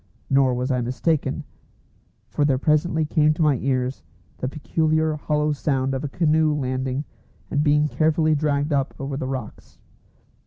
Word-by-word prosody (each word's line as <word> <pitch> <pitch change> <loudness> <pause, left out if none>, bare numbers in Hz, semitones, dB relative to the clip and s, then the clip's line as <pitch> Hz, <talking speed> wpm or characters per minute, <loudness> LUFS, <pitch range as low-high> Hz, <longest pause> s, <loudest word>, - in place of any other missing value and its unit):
Nor 135 -2 +4
was 125 +2 -1
I 125 -1 +1
mistaken, 130 +6 -1 0.9
for 145 - 0
there 140 -3 +3
presently 155 +3 +1
came 150 0 +2
to 160 - 0
my 145 -4 +3
ears 130 0 -1 0.4
the 130 - -2
peculiar 155 +2 0
hollow 150 0 0
sound 135 -2 0
of 135 - -3
a - - -1
canoe 155 0 +2
landing 130 0 -2 0.5
and 145 0 +1
being 150 0 +3
carefully 155 +1 +2
dragged 145 0 0
up 135 -2 0
over 135 0 -4
the 135 -1 -3
rocks. 130 -4 -7
145 Hz, 155 wpm, -23 LUFS, 130-155 Hz, 0.9 s, Nor